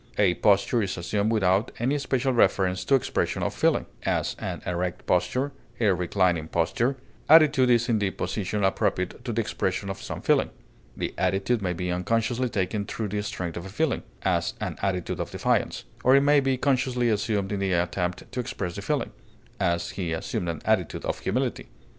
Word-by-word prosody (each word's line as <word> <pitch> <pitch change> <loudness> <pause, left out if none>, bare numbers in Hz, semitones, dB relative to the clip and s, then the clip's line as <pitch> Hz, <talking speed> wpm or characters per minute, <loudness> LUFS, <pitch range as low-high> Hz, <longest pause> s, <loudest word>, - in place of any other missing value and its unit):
A 100 -4 +4
posture 105 +5 +3
is 100 -2 -2
assumed 100 +5 0
without 95 -1 +2
any 135 +5 0
special 130 -1 0
reference 95 -4 +2
to 135 - +4
expression 130 - 0
of - - -1
feeling; - - +2 0.2
as, - - -1
an - - -5
erect 90 0 -2
posture, 90 +11 +1 0.3
a 105 -5 +4
reclining 90 -2 +1
posture; 115 +12 0 0.3
attitude 150 -5 +7
is 120 -1 +4
the 105 -5 +1
position 100 +2 -2
appropriate 95 +2 0
to 120 - -3
the 115 - -1
expression 100 -1 -2
of 95 - -7
some - - -6
feeling; - - +3 0.5
the - - -3
attitude 100 +4 +1
may 90 -2 -1
be 90 +1 -3
unconsciously 115 +7 0
taken 100 0 -1
through 105 +1 -4
the 105 +1 -1
strength 90 -4 -4
of 85 - -5
the 95 - -8
feeling; 155 +9 0 0.2
as, - - 0
an - - -3
attitude 90 -3 -1
of - - -3
defiance; - - 0 0.2
or 130 +2 +6
it 140 - +6
may 145 +1 +5
be 135 -1 +1
consciously 130 -2 +1
assumed 105 -2 0
in 100 - -1
the 95 -1 0
attempt 90 +4 -1
to 130 - -4
express 100 -7 -3
the - - -4
feeling; - - -1 0.5
as, 85 0 0
he 85 -4 -3
assumed 85 +1 -3
an 80 - -5
attitude - - 0
of - - -2
humility. - - -2
100 Hz, 185 wpm, -26 LUFS, 90-120 Hz, 0.5 s, attitude